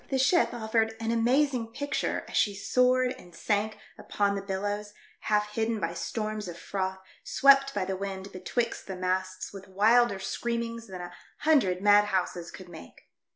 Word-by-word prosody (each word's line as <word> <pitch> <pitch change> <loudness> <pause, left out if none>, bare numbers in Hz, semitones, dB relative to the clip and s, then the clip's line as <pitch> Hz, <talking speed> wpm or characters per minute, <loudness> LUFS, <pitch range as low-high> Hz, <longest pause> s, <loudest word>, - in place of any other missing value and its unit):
The 270 - 0
ship 285 +7 +3
offered 225 -1 0
an 225 0 -1
amazing 240 0 +1
picture 285 +3 -2
as - - -8
she 205 -2 +2
soared 250 +4 +2
and 175 -6 -15
sank 210 0 -1 0.2
upon 200 -1 0
the 200 - -3
billows, 205 +2 -3 0.2
half 210 0 +1
hidden 220 +1 -1
by 170 -2 -2
storms 215 +5 -3
of 170 -1 -7
froth 190 +1 -3 0.3
swept 275 0 +5
by 195 -2 0
the 190 0 -2
wind 195 0 -5
betwixt 230 +6 -3
the 190 - -5
masts 185 +1 -2
with 195 -1 -10
wilder 215 +3 +4
screaminos 230 +3 -3
than 185 -2 -7
a 175 0 -8 0.3
hundred 200 - +3
mad 205 0 +6
houses 180 -3 -2
could 185 - -11
make. 165 -2 -13
205 Hz, 165 wpm, -28 LUFS, 190-235 Hz, 0.3 s, mad